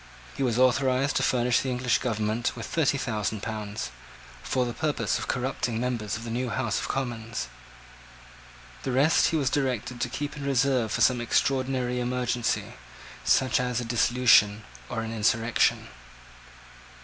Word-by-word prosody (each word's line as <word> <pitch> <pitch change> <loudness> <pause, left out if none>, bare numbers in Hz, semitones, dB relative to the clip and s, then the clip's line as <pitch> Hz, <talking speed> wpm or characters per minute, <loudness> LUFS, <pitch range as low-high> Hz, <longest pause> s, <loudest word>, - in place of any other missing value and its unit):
He - - -5
was 120 -4 +1
authorised 130 +2 +2
to - - +1
furnish 125 -1 +2
the 135 - -2
English 125 -1 +1
government 110 0 -1
with 115 -3 -6
thirty 145 -1 +1
thousand 110 -5 -2
pounds, 110 -1 -4 0.5
for 130 -1 0
the 120 - -4
purpose 150 +2 -1
of - - -5
corrupting 125 -2 -2
members 115 -5 -2
of 115 - -8
the 115 - -6
New 125 +1 -2
House 120 -2 -1
of - - -4
Commons. 115 - -3 1.3
The 135 - -3
rest 145 +6 +4
he - - 0
was 135 -4 0
directed 125 -3 -1
to 125 - 0
keep 145 +4 -4
in 145 - -7
reserve 135 -4 +1
for 115 - -1
some 120 +1 +4
extraordinary 130 0 0
emergency, 125 -1 -1 0.5
such 130 -2 +3
as 125 -1 -1
a 120 - -4
dissolution 115 -3 +4 0.3
or 115 - -2
an 115 0 -5
insurrection. 115 +1 +1
125 Hz, 155 wpm, -27 LUFS, 115-130 Hz, 1.3 s, rest